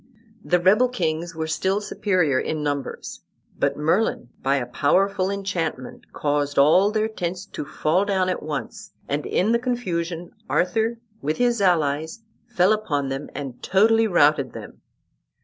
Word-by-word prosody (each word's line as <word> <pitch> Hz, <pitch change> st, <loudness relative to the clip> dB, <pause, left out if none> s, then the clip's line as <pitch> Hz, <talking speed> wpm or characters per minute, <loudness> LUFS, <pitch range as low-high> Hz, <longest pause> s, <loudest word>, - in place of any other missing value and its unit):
The 180 Hz, -, +2 dB
rebel 210 Hz, +8 st, +4 dB
kings 170 Hz, -7 st, -2 dB
were 160 Hz, 0 st, -2 dB
still 190 Hz, +5 st, 0 dB
superior 185 Hz, -9 st, +1 dB
in 155 Hz, -1 st, -2 dB
numbers; 145 Hz, -2 st, -4 dB, 0.4 s
but -, -, +1 dB
Merlin, 160 Hz, -, 0 dB
by 135 Hz, +1 st, +2 dB
a 130 Hz, -3 st, -1 dB
powerful 185 Hz, +9 st, +1 dB
enchantment, 185 Hz, -9 st, -4 dB
caused 145 Hz, -1 st, -1 dB
all 160 Hz, +8 st, +5 dB
their 215 Hz, 0 st, 0 dB
tents 180 Hz, -3 st, -4 dB
to -, -, -6 dB
fall 155 Hz, +5 st, 0 dB
down 190 Hz, -2 st, +1 dB
at 185 Hz, -, -1 dB
once, 190 Hz, +8 st, -6 dB
and 145 Hz, +1 st, -2 dB
in 205 Hz, +5 st, +1 dB
the 235 Hz, -, +3 dB
confusion 175 Hz, -9 st, -3 dB, 0.2 s
Arthur 225 Hz, +6 st, +1 dB, 0.2 s
with 155 Hz, 0 st, -1 dB
his 240 Hz, -3 st, +1 dB
allies 160 Hz, +1 st, +1 dB, 0.2 s
fell 205 Hz, -3 st, +3 dB
upon 145 Hz, -11 st, -1 dB
them 135 Hz, +2 st, -4 dB
and 135 Hz, -4 st, -6 dB
totally 225 Hz, +4 st, +3 dB
routed 145 Hz, -, +3 dB
them. -, -, -10 dB
175 Hz, 150 wpm, -23 LUFS, 150-205 Hz, 0.4 s, all